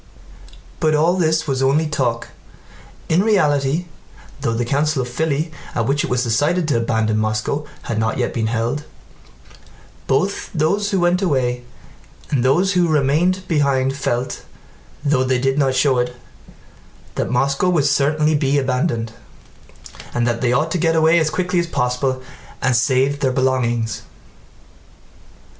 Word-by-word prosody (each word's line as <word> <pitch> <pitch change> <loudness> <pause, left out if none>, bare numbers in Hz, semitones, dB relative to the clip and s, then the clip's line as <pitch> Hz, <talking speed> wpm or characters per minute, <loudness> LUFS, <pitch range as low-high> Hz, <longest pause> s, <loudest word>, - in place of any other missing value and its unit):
But 155 -1 +2
all 160 +4 +3
this 160 -3 +1
was 135 -2 -1
only 140 +4 +2
talk; 125 -6 -1 0.8
in 165 +3 +3
reality 155 -6 +2 0.5
(though 115 -5 -1
the 120 +1 -1
Council 145 +2 0
of - - -6
Filí, 155 +4 -1 0.2
at 115 - 0
which 140 +4 +1
it - - -3
was 125 0 +1
decided 150 +9 +1
to 130 - +2
abandon 110 -2 0
Moscow, 110 +7 -1 0.2
had 110 -2 -2
not 110 0 0
yet 120 -2 -1
been 110 -2 -1
held) 115 +6 -2 1.2
both 185 +10 0
those 200 +7 +1
who 195 - 0
went 175 +2 +2
away 125 -8 0 0.7
and 130 -4 +1
those 175 +10 +2
who 180 -2 +3
remained 160 +5 +1
behind 135 -4 +1
felt, 125 -2 -2 0.6
though 140 -3 +2
they 130 0 +1
did 135 +2 0
not 135 -2 +2
show 130 -1 +3
it, 125 0 -2 1.0
that - - -2
Moscow 140 +7 +1
would 160 -6 +2
certainly 150 +2 +2
be 145 -1 +1
abandoned, 125 -4 -1 1.0
and 120 0 +1
that 120 -1 -1
they 125 -2 +2
ought 155 +6 +1
to 180 - 0
get 165 0 +2
away 160 +1 +4
as 155 -1 +1
quickly 180 +1 0
as 170 - -1
possible 130 -2 -1 0.4
and 125 - +1
save 130 +3 +2
their 135 -2 +1
belongings. 125 -4 0
140 Hz, 150 wpm, -19 LUFS, 125-160 Hz, 1.2 s, away